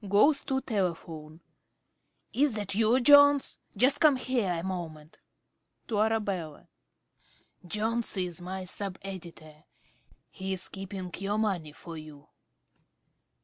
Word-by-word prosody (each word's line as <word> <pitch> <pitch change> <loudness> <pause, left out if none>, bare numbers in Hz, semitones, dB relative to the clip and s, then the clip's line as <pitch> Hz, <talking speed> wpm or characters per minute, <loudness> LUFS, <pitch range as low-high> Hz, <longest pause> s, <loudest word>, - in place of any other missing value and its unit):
(Goes 275 +9 +4
to 265 -1 0
telephone.) 165 -7 -3 0.9
Is 275 -3 +2
that 205 -2 -3
you, 225 +4 +3
Jones? 285 +1 +6 0.2
Just 275 +3 +4
come 305 -4 +6
here 250 -6 0
a 165 -1 -3
moment. 165 -5 -6 0.7
(To 215 -3 0
Arabella) 200 -8 -1 0.9
Jones 220 +4 -1
is 180 -1 -2
my 185 +1 -5
sub 190 +1 -3
editor; 165 -5 -9 0.7
he 190 0 -4
is 185 -1 -1
keeping 190 -2 -6
your 200 +2 -1
money 190 -8 -1
for 165 0 -9
you. 150 -1 -13
195 Hz, 115 wpm, -29 LUFS, 170-225 Hz, 0.9 s, Jones